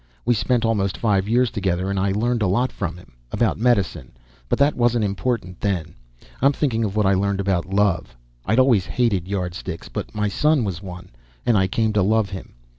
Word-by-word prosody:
We 120 - +4
spent 120 +1 +1
almost 100 -4 0
five 100 -3 +1
years 125 +1 +3
together 95 -3 -1
and 100 - -1
I 95 +1 +1
learned 115 +3 0
a 105 - +2
lot 120 +8 +1
from 90 -3 -4
him. 90 - -16 0.2
About 115 -3 0
medicine, 100 - 0 0.4
but - - +1
that 140 +1 +3
wasn't 120 -2 +2
important 100 -2 -2
then. 85 -5 -2 0.5
I'm 140 +2 +4
thinking 120 -6 0
of 100 -2 -2
what 105 -1 +2
I 95 - +4
learned 100 +1 0
about 95 -3 0
love. 95 -11 0 0.3
I'd 110 - 0
always 125 -8 +4
hated 105 -8 0
Yardsticks, 90 -2 -4
but - - -6
my 105 0 0
son 150 +5 +2
was 95 -4 -3
one, 90 -2 -9 0.4
and 120 - +3
I 95 -2 +3
came 110 +2 0
to 105 - +2
love 105 +1 +2
him. 95 -9 -8
100 Hz, 200 wpm, -22 LUFS, 95-115 Hz, 0.5 s, We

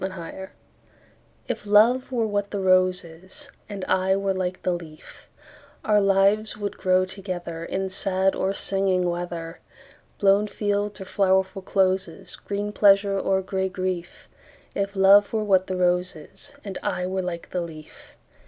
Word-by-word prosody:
A 190 - -1
Match 190 +1 -8 1.0
IF 210 - -4
love 235 +6 +4
were 235 -3 0
what 205 -1 -1
the 200 - -3
rose 185 -1 +3
is, 170 +3 -12 0.2
And 200 -2 -5
I 190 +1 +2
were 195 0 0
like 185 -1 -3
the 180 - +1
leaf, 160 -3 -10 0.6
Our 210 -1 +4
lives 200 +2 +2
would 205 -1 -4
grow 185 0 +2
togetherIn 185 -1 -5
sad 190 0 +1
or 190 - -1
singing 190 -2 0
weather, 170 -1 -5 0.6
Blown 200 +1 +3
fields 205 0 -2
or - - -6
flowerful 190 0 +1
closes, 185 -2 -1
Green 205 +1 -4
pleasure 200 -1 +4
or 190 0 0
gray 190 0 -2
grief; 185 -2 -4 0.5
If 200 0 -2
love 195 +1 +6
were 220 -1 0
what 190 -3 +2
the 185 - -2
rose 180 0 +1
is, 160 - -11
And 195 -2 -6
I 180 - -2
were 190 +1 -2
like 175 -2 -6
the 180 - -1
leaf. 155 -3 -11
190 Hz, 155 wpm, -24 LUFS, 185-200 Hz, 1.0 s, love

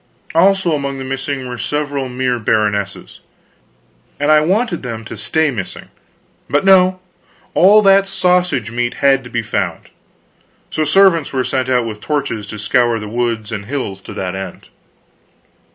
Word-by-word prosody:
Also 190 0 +3
among 140 -2 -2
the 135 - -5
missing 135 0 -4
were 125 -1 -6
several 145 -1 -2
mere 125 -1 -1
baronesses 105 -2 -1 1.0
and 145 +1 +2
I 155 0 +6
wanted 190 +3 0
them 115 -3 -6
to - - -7
stay 160 -2 +1
missing; 100 -7 -6 0.6
but 145 +6 +1
no, 185 -1 +5 0.5
all 210 +4 +6
that 195 0 +5
sausage 180 - +1
meat 120 0 -2
had 135 -1 +3
to 120 - -11
be 120 -1 -2
found; - - -3 0.8
so 155 - 0
servants 170 -1 +3
were 130 -1 0
sent 130 0 -1
out 125 -2 +2
with 105 -2 -6
torches 135 -7 -2
to 105 - -7
scour 120 +2 +1
the 105 -1 -6
woods 115 -1 -2
and 100 -2 -5
hills 125 -9 -4
to - - -10
that 95 -1 -3
end. 95 -2 -8
130 Hz, 155 wpm, -17 LUFS, 115-160 Hz, 1.0 s, I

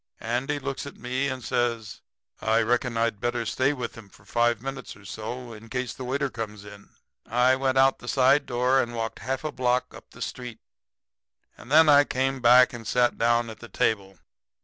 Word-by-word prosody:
Andy 125 +6 -2
looks 140 0 -5
at 140 - -10
me 130 +3 -2
and 130 -2 -4
says: 115 -3 -2 0.4
'I 110 +1 +2
reckon 120 +1 0
I'd 115 -2 0
better 120 0 -1
stay 130 +5 +1
with 125 -5 -5
him 110 -4 -13
for - - -21
five 120 -1 +1
minutes 135 +3 -7
or 100 0 -17
so, 115 +4 -6
in 110 +1 -12
case 125 0 -3
the 130 - -8
waiter 135 +1 -1
comes 105 -3 -6
in.' 100 0 -13 0.4
"I 125 +2 +3
went 130 0 0
out 135 0 +4
the 120 - -12
side 135 +3 +3
door 125 +2 +2
and 120 -1 -4
walked 115 -1 -4
half 130 +2 -3
a 155 - -2
block 125 0 0
up - - -13
the - - -15
street. 125 -3 -7 1.0
And 120 - -14
then 160 +1 +7
I 145 -1 +7
came 135 -1 -1
back 125 +1 +6
and 115 -2 -8
sat 125 +1 +2
down 120 0 +2
at 110 - -12
the 120 - -11
table. 95 -2 -1
120 Hz, 200 wpm, -26 LUFS, 115-130 Hz, 1.0 s, then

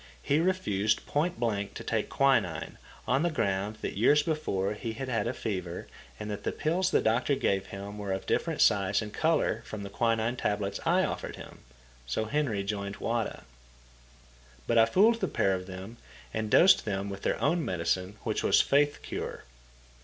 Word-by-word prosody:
He 145 - +2
refused 110 - +1
point 155 0 -1
blank 105 -4 -1
to - - -6
take - - -1
quinine, 110 - +1 0.3
on 135 +3 +2
the 175 - +2
ground 100 - -1
that - - -3
years 145 +6 +5
before 105 - -1
he 110 +1 -5
had 130 +4 -5
had 115 -1 0
fever 90 -7 -4 0.3
and 105 0 -5
that 105 - -5
the - - -1
pills 180 +4 0
the - - +3
doctor 120 +5 +2
gave 95 -6 0
him 100 +1 -7
were 100 -1 -3
of 95 - -3
different - - 0
size 100 +1 +3
and 105 - -8
colour 160 -8 +1
from 110 -3 -7
the 100 - -7
quinine 115 +2 0
tablets 100 -2 -1
I - - +4
offered - - -3
him. - - -11 0.5
So 110 - -1
Henry 120 -6 0
joined 100 0 -3
Wada. 115 -1 -2 1.2
But 115 -1 +3
I 115 - +6
fooled 225 +5 +4
the - - 0
pair 95 - +1
of 90 0 -4
them, 95 +5 -8 0.4
and 110 -1 -2
dosed 185 - +6
them 100 -2 -2
with 100 -1 -6
their - - 0
own 165 +4 +1
medicine, 90 - -1
which - - -1
was - - +4
faith 145 +1 +2
cure. - - -5
110 Hz, 180 wpm, -29 LUFS, 100-140 Hz, 1.2 s, I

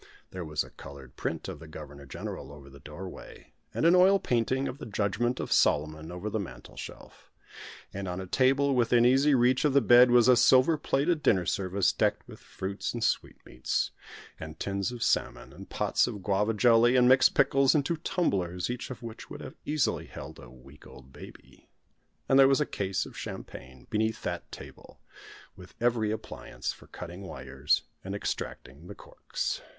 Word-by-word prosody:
There 90 -1 -6
was 75 -2 -2
a - - -14
coloured 70 -2 -12
print - - -4
of - - -7
the 80 - -12
Governor 75 -3 -11
General 65 - -7
over 70 -1 -13
the 70 - -14
doorway, 90 +7 -11 0.2
and - - -1
an 170 - +6
oil 185 +2 +6
painting 130 - 0
of 130 - -6
the - - -7
Judgment 110 +4 -1
of - - -5
Solomon 75 +2 +1
over 90 +4 -6
the 110 +1 -2
mantelshelf. 100 - -10 0.6
And 100 0 -5
on 90 0 -4
a 95 - -5
table 135 +7 +2
within 120 -1 +3
easy 135 +3 +4
reach 125 +1 +3
of 150 -3 +2
the 140 - +6
bed 120 +1 +6
was 120 -1 +5
a 125 - +7
silver 130 +6 +5
plated 150 +2 0
dinner 95 -11 +2
service, 95 +1 0
decked - - 0
with - - -12
fruits 100 +5 -5
and 115 - -3
sweetmeats, 65 +1 -2 0.5
and 80 0 -9
tins 100 +2 -2
of 120 -2 -4
salmon, - - -1
and - - -12
pots - - +1
of 105 -6 -6
Guava 105 +3 +1
jelly 120 +2 +5
and 125 -1 +5
mixed 130 +1 +5
pickles, 135 0 +4
and 145 -2 +2
two 170 - -1
tumblers, 100 - -1
each 125 -1 -5
of 130 - -8
which 115 -1 -9
would - - -8
have - - -8
easily 150 -3 0
held - - -10
a - - -12
week 70 +3 -16
old 65 0 -15
baby. - - -14 0.6
And 135 - +4
there 135 - +8
was 135 +1 +3
a 150 - +1
case 95 -6 -2
of - - -12
champagne 65 -1 -9
beneath 110 0 -1
that - - -5
table, - - -12 0.6
with 90 0 -14
every 115 -2 +1
appliance 110 0 -5
for - - -17
cutting 90 +1 -9
wires 95 - -1 0.2
and 95 +1 -5
extracting 80 -5 -6
the - - -9
corks. - - -5
110 Hz, 185 wpm, -28 LUFS, 90-130 Hz, 0.6 s, there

